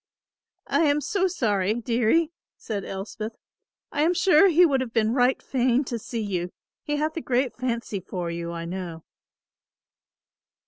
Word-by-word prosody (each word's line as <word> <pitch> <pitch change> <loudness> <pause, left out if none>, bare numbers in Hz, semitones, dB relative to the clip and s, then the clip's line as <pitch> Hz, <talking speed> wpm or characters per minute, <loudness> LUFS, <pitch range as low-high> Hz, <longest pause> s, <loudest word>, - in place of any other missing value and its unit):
"I - - +1
am 290 0 +3
so 380 +5 0
sorry, 210 - 0
dearie," 240 +7 +2 0.3
said 205 -3 -4
Elspeth; 210 +4 -5 0.6
"I 290 - -1
am 340 +4 +3
sure 360 0 +6
he 355 0 +6
would 275 -5 +2
have 240 -3 -5
been 225 -1 +2
right 250 0 +3
fain 255 +1 +1
to 240 -3 -4
see 225 +1 -4
you, 180 -3 -2 0.3
he 295 - -2
hath 310 +2 -1
a - - -1
great 255 -1 0
fancy 235 -5 -2
for 180 -2 -4
you, 170 0 -4
I 170 0 -5
know." 170 -2 -6
240 Hz, 155 wpm, -25 LUFS, 200-295 Hz, 0.6 s, sure